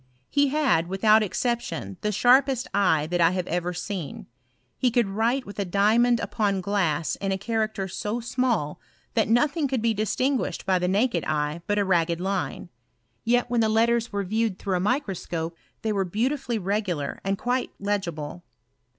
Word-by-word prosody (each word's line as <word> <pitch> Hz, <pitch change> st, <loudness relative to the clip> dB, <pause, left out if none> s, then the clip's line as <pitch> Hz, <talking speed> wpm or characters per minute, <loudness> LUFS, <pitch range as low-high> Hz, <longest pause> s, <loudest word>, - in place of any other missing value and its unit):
He 285 Hz, 0 st, +3 dB
had, 270 Hz, -, +2 dB
without 215 Hz, +4 st, +4 dB
exception, 195 Hz, -, -2 dB
the 210 Hz, -, 0 dB
sharpest 255 Hz, +4 st, +4 dB
eye 170 Hz, -7 st, +3 dB
that 175 Hz, +2 st, -1 dB
I 165 Hz, -, +6 dB
have 185 Hz, -1 st, -1 dB
ever 175 Hz, +1 st, -1 dB
seen: 180 Hz, -3 st, -5 dB, 0.5 s
he 255 Hz, -, +2 dB
could 240 Hz, -2 st, +2 dB
write 230 Hz, +6 st, 0 dB
with 205 Hz, -, -9 dB
a -, -, +2 dB
diamond 220 Hz, +6 st, +3 dB
upon 205 Hz, -4 st, 0 dB
glass 175 Hz, -6 st, 0 dB
in 195 Hz, -1 st, -2 dB
a 190 Hz, -, 0 dB
character 215 Hz, -1 st, -2 dB
so 210 Hz, +5 st, -3 dB
small, 235 Hz, -, -1 dB, 0.3 s
that 220 Hz, -2 st, +1 dB
nothing 285 Hz, +6 st, +2 dB
could 265 Hz, -2 st, -1 dB
be 230 Hz, -1 st, +3 dB
distin 255 Hz, +6 st, 0 dB
guished -, -, -4 dB
by 190 Hz, -1 st, +2 dB
the 180 Hz, -, 0 dB
naked 195 Hz, -2 st, +1 dB
eye 150 Hz, +2 st, -1 dB
but 205 Hz, -, +1 dB
a 205 Hz, -, +2 dB
ragged 170 Hz, -2 st, +1 dB
line; 190 Hz, -1 st, -3 dB, 0.5 s
yet 245 Hz, +1 st, +2 dB
when 240 Hz, -1 st, +2 dB
the 220 Hz, -, +2 dB
letters 230 Hz, +1 st, +2 dB
were 200 Hz, -1 st, -1 dB
viewed 215 Hz, 0 st, -1 dB
through 190 Hz, -2 st, -1 dB
a -, -, -1 dB
microscope, 180 Hz, -, -2 dB, 0.3 s
they 220 Hz, -1 st, 0 dB
were 195 Hz, -1 st, +1 dB
beautifully 235 Hz, +6 st, -1 dB
regular 185 Hz, -7 st, -2 dB
and 195 Hz, 0 st, 0 dB
quite 250 Hz, +4 st, -1 dB
legible. 175 Hz, -5 st, -3 dB
205 Hz, 175 wpm, -25 LUFS, 180-235 Hz, 0.5 s, I